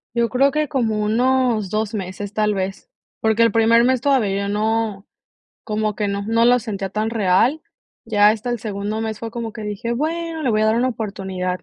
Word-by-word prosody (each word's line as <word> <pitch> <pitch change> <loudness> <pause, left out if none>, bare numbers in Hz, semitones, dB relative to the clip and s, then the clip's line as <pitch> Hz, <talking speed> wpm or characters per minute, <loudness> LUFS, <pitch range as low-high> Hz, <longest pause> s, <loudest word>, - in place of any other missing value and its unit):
Yo 235 -1 +2
creo 270 +4 +3
que 305 +1 0
como 230 -7 0
unos 235 -2 +1
2 215 0 -1
meses, 195 +1 -5
tal 210 -1 +2
vez. 190 0 -4 0.3
Porque 220 0 +1
el 230 -1 +5
primer 230 +2 +4
mes 255 +1 +2
todavía 225 -8 +1
yo - - -3
no, 215 -1 -1 0.6
como 215 -1 -2
que 210 - -1
no, 200 0 -2
no 225 +2 +2
lo 245 +1 +5
sentía 200 -4 -4
tan 215 +3 -2
real. 225 +7 +2 0.4
Ya 210 -2 +4
hasta 220 +3 0
el 240 -2 -2
segundo 205 0 -3
mes 220 -1 -3
fue 225 -1 -6
como 230 -2 -5
que 220 - -8
dije, 210 +3 -3
bueno, 320 +4 -2
le 255 - +2
voy 215 -1 +2
a - - +3
dar 220 +1 +2
una 250 +2 +2
oportunidad. 190 -5 -4
220 Hz, 205 wpm, -21 LUFS, 205-235 Hz, 0.6 s, el